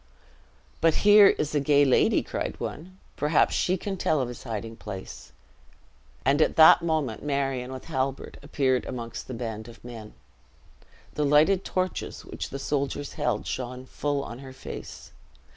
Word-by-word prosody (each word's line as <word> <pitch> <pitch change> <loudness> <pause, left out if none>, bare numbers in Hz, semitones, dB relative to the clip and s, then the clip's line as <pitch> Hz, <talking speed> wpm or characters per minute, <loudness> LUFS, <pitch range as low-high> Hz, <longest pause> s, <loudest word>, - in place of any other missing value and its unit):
"But 165 -1 +4
here 205 -1 +9
is 150 -5 0
a 150 - +2
gay 145 0 +4
ladie," 130 - +3
cried - - -4
one; 185 +4 -7 0.2
"perhaps 150 +1 +2
she 185 +1 +1
can 195 +2 -4
tell 155 -3 +1
of 125 -2 -1
his 125 - -9
hiding 115 -1 -5
place." 95 -3 -8 0.9
And 140 +3 +3
at 160 +2 +7
moment 155 -9 -1
Marion, 135 -3 -2
with 130 -1 -8
Halbert, 135 -3 -3
appeared 135 -3 0
amongst 120 -1 -6
a 130 - -4
band 110 -2 -5
of 115 -1 -14
men. 115 -3 -9 1.0
The 150 - -1
lighted 155 +7 +4
torches 185 0 -3
which - - -6
the 135 - -5
soldiers 140 0 -2
held, 115 -4 -1
shone 125 0 -5
full 145 +1 -2
on 120 -1 -8
her 135 -1 -10
face. - - -9
140 Hz, 155 wpm, -26 LUFS, 125-155 Hz, 1.0 s, here